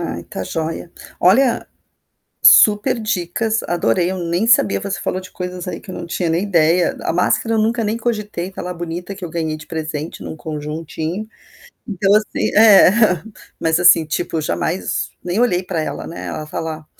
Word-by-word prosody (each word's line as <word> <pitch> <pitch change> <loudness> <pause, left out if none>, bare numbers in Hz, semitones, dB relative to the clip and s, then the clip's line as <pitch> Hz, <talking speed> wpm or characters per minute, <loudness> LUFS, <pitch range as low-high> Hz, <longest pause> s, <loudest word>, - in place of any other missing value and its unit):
Ai, 85 - -4
tá 85 - -6
joia. 160 - -4 0.3
Olha, 235 +7 +3 0.8
superdicas, 215 -1 +3
adorei. 175 +1 0
Eu 190 - -4
nem 175 +5 -1
sabia 105 - +4
você 200 - -4
falou 185 - -2
de 185 0 -12
coisas 180 -1 -6
aí 175 - -4
que 190 - -10
eu - - -7
não - - -6
tinha 170 0 -2
nem 165 +3 +1
ideia. 175 -2 +2
A - - 0
máscara 180 +6 +1
eu - - +2
nunca 225 +2 +1
nem 215 +2 -1
cogitei, 210 -6 -3
tá - - -7
lá 180 - -5
bonita, 175 +2 -6
que 195 -2 -7
eu - - -7
ganhei 160 -1 -3
de 155 - -13
presente 155 -1 -5
num - - -6
conjuntinho. 160 +5 -5 0.6
Então, 195 0 +2
assim 215 0 0
é, 210 -4 +8 0.7
mas, 160 +1 +1
assim, 175 -2 +6
tipo, 160 +1 -2
jamais, 165 +4 -2
nem 180 +5 -1
olhei 185 -7 +2
pra 180 -3 -3
ela, 155 - -4
né. 170 - -7
Ela 155 - -5
tá 150 - -5
lá. 160 -1 -6
175 Hz, 180 wpm, -19 LUFS, 160-205 Hz, 0.8 s, é